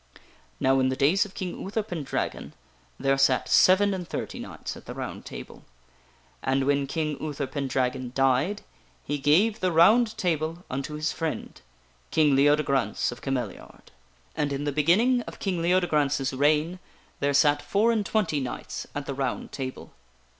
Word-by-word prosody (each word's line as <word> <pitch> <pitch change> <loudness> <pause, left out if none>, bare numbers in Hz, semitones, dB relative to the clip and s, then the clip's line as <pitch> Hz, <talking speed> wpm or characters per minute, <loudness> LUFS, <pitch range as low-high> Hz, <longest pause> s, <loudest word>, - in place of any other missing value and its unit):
" - - -32
Now, 135 0 +3
in 130 0 +2
the 130 - -1
days 160 +11 +3
of 195 - -13
King 180 -2 -5
Uther 210 +3 -2
Pendragon, 165 -9 -4 0.5
there 135 0 +1
sat 135 -1 +3
seven 200 +2 +5
and 180 -3 -5
thirty - - -5
knights - - -7
at - - -14
the - - -6
ROUND - - -6
TABLE. - - -9 0.8
And 135 +1 +1
when 140 0 +1
King 150 0 -2
Uther 150 -2 -3
Pendragon 130 -2 -2
died, 135 +9 +1 0.4
he 145 0 -2
gave 185 +11 +3
the 185 -1 +1
ROUND 215 +8 +5
TABLE 165 0 -1
unto 135 +3 -4
his 155 +1 -1
friend, 160 -2 -4 0.5
King 150 -3 +3
Leodegrance 140 -2 +2
of 120 - -10
Came 135 -1 -1
liard. 120 -6 -7 0.2
" - - -35
And 150 -2 -1
in 140 +1 -2
the 145 - -1
beginning 195 - +3
of - - -8
King 185 -4 -2
Leodegrance's 150 -6 +1
reign, 150 +6 +2 0.4
there 140 0 +1
sat 145 +1 +4
four 215 +4 +2
and 220 -2 +1
twenty 195 -8 0
knights 130 -2 -5
at 145 0 -3
the 140 - -4
ROUND 135 -2 -3
TABLE. 130 -2 -6
145 Hz, 170 wpm, -26 LUFS, 135-180 Hz, 0.8 s, seven